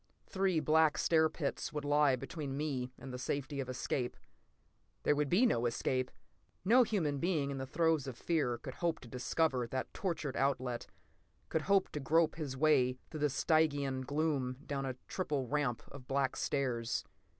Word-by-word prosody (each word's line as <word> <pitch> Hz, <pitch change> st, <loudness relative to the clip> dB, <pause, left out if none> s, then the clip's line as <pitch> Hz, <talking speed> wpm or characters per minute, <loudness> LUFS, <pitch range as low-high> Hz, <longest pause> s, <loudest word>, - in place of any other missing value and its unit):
Three 190 Hz, -3 st, +1 dB
black 155 Hz, 0 st, +4 dB
stair 160 Hz, -1 st, +4 dB
pits 155 Hz, -3 st, -3 dB
would 150 Hz, -1 st, -4 dB
lie 145 Hz, -2 st, +4 dB
between 140 Hz, +1 st, -5 dB
me 135 Hz, -4 st, -2 dB
and 130 Hz, -1 st, -8 dB
the 125 Hz, -, -5 dB
safety 140 Hz, +2 st, -3 dB
of 130 Hz, -2 st, -3 dB
escape. 125 Hz, 0 st, -2 dB, 0.9 s
There 150 Hz, -, +3 dB
would 145 Hz, -1 st, 0 dB
be 205 Hz, +9 st, +5 dB
no 120 Hz, -, +2 dB
escape! 130 Hz, +2 st, 0 dB, 0.6 s
No 240 Hz, +6 st, +7 dB
human 170 Hz, -, +1 dB
being 155 Hz, -5 st, 0 dB
in 135 Hz, -, -4 dB
the 130 Hz, -, -4 dB
throes 160 Hz, -1 st, +1 dB
of 125 Hz, -3 st, -6 dB
fear 145 Hz, -8 st, 0 dB
could 130 Hz, +2 st, -8 dB
hope 170 Hz, +1 st, -1 dB
to 125 Hz, -, -11 dB
discover 125 Hz, +1 st, 0 dB
that 130 Hz, +2 st, -4 dB
tortured 160 Hz, -8 st, -2 dB
outlet, 130 Hz, -3 st, 0 dB, 0.6 s
could 160 Hz, -, 0 dB
hope 195 Hz, +3 st, +3 dB
to 150 Hz, -, -4 dB
grope 160 Hz, +4 st, +3 dB
his 145 Hz, -5 st, -5 dB
way 130 Hz, -4 st, +3 dB
through 150 Hz, -2 st, 0 dB
Stygian 140 Hz, -2 st, +2 dB
gloom 140 Hz, -2 st, -1 dB
down 135 Hz, -1 st, -2 dB
a 130 Hz, -, -3 dB
triple 150 Hz, -8 st, -1 dB
ramp 140 Hz, -3 st, 0 dB
of 135 Hz, -3 st, -11 dB
black 135 Hz, -1 st, +1 dB
stairs. 125 Hz, -5 st, -1 dB
140 Hz, 170 wpm, -34 LUFS, 130-160 Hz, 0.9 s, No